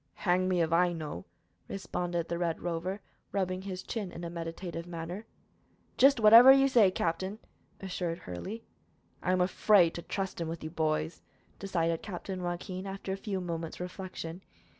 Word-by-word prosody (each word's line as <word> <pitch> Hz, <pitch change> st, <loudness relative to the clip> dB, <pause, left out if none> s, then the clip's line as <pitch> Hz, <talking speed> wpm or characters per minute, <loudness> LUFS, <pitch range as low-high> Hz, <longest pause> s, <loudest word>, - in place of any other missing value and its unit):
"Hang 185 Hz, 0 st, +3 dB
me 180 Hz, -2 st, +3 dB
if 165 Hz, 0 st, -1 dB
I 175 Hz, +1 st, +4 dB
know," 150 Hz, -, -6 dB, 0.4 s
responded 175 Hz, -2 st, -3 dB
the 170 Hz, 0 st, -3 dB
Red 170 Hz, -2 st, -1 dB
Rover, 175 Hz, +4 st, -3 dB, 0.3 s
rubbing 185 Hz, -2 st, -1 dB
his 190 Hz, -1 st, -6 dB
chin 205 Hz, -6 st, -4 dB
in 170 Hz, -, -8 dB
a 170 Hz, -, -4 dB
meditative 170 Hz, 0 st, -5 dB
manner. 175 Hz, +5 st, -6 dB, 0.7 s
"Jist 275 Hz, -1 st, +6 dB
whatever 230 Hz, +4 st, +10 dB
you 270 Hz, 0 st, +6 dB
say, 235 Hz, -7 st, +5 dB
captain," 185 Hz, +3 st, -2 dB, 0.4 s
assured 180 Hz, -3 st, -3 dB
Hurley. 185 Hz, -, -7 dB, 0.6 s
"I 180 Hz, -, 0 dB
am 185 Hz, 0 st, +2 dB
afraid 180 Hz, -1 st, +4 dB
to 170 Hz, -, -5 dB
trust 190 Hz, -1 st, -4 dB
him 165 Hz, -, -2 dB
with 165 Hz, 0 st, -5 dB
you, 155 Hz, -, -5 dB
boys," 160 Hz, 0 st, -1 dB, 0.4 s
decided 170 Hz, -4 st, 0 dB
Captain 190 Hz, -1 st, -5 dB
Joaquin, 180 Hz, +2 st, -4 dB
after 195 Hz, 0 st, -4 dB
a -, -, -1 dB
few 195 Hz, -1 st, -3 dB
moments' 165 Hz, -2 st, -4 dB
reflection. 180 Hz, -1 st, -6 dB
180 Hz, 160 wpm, -30 LUFS, 170-195 Hz, 0.7 s, whatever